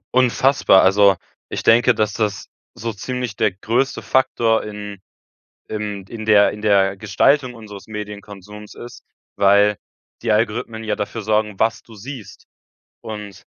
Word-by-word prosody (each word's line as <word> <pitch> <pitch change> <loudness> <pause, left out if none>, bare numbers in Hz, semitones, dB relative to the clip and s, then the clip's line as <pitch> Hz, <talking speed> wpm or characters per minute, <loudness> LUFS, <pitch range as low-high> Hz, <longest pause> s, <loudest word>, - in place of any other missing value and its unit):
Unfassbar. 130 -4 +4
Also, 100 -1 +4 0.3
ich - - -4
denke, 120 +2 +5
dass 105 -1 -1
das 105 -3 -2 0.3
so 115 0 -5
ziemlich 125 0 -5
der - - +1
größte 115 +8 -1
Faktor 120 -4 +1
in 105 -2 -8 0.7
im 105 -2 -4
in 110 -2 -7
der 105 -2 +5
in 105 +1 -9
der 100 -2 +2
Gestaltung 130 +4 +2
unseres 105 -4 -11
Medienkonsums 105 -1 -9
ist, 120 0 -11 0.3
weil 100 +1 +4 0.4
die 115 -2 +1
Algorithmen 110 +1 -1
ja 110 -1 -2
dafür 110 +2 -4
sorgen, 105 -1 -1
was 115 +1 +1
du 115 - -16
siehst. 110 -2 -10 0.6
Und 105 -2 -9
105 Hz, 135 wpm, -20 LUFS, 100-115 Hz, 0.7 s, denke